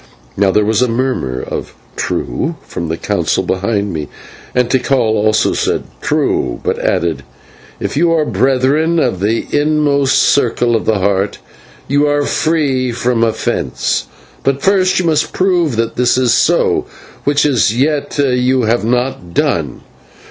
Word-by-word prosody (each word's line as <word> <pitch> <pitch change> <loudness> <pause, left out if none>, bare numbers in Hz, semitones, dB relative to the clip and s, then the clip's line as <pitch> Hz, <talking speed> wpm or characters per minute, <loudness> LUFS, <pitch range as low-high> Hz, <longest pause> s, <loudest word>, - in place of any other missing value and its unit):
Now 100 0 +2
there 105 +2 +2
was 110 +2 +1
a 125 - +3
murmur 115 - -2
of - - -6 0.2
"True" 155 - -2
from 85 - -5
the 80 - -2
Council - - -1
behind 100 +1 -1
me, 75 -2 -4 0.5
and 125 -1 +2
Tikal 130 +2 +1
also 110 -2 +2
said - - -1 0.2
"True," - - 0
but - - -1
added, 85 -1 0 0.6
"If - - -3
you 165 +3 +2
are 160 -2 +2
Brethren 140 +6 +1
from 125 - 0
the 110 +4 0
inmost 145 -2 +2
circle 120 -3 +2
of 115 - -1
the 110 - +2
Heart, 100 +1 0 0.5
you 145 +2 +2
are 145 0 +1
free 140 -6 0
from 120 0 0
offence; 115 -1 -1 0.4
but 135 0 0
first 190 -1 +3
you 180 - +1
must 155 -2 +1
prove 175 -7 +1
that 115 0 -2
this 125 0 +2
is 125 -3 +3
so, - - +2 0.4
which 145 +1 +2
as 115 - +2
yet 145 +1 0
you 130 -2 +2
have 115 +1 +1
not 120 -7 -2
done. - - -1
125 Hz, 150 wpm, -15 LUFS, 110-145 Hz, 0.6 s, a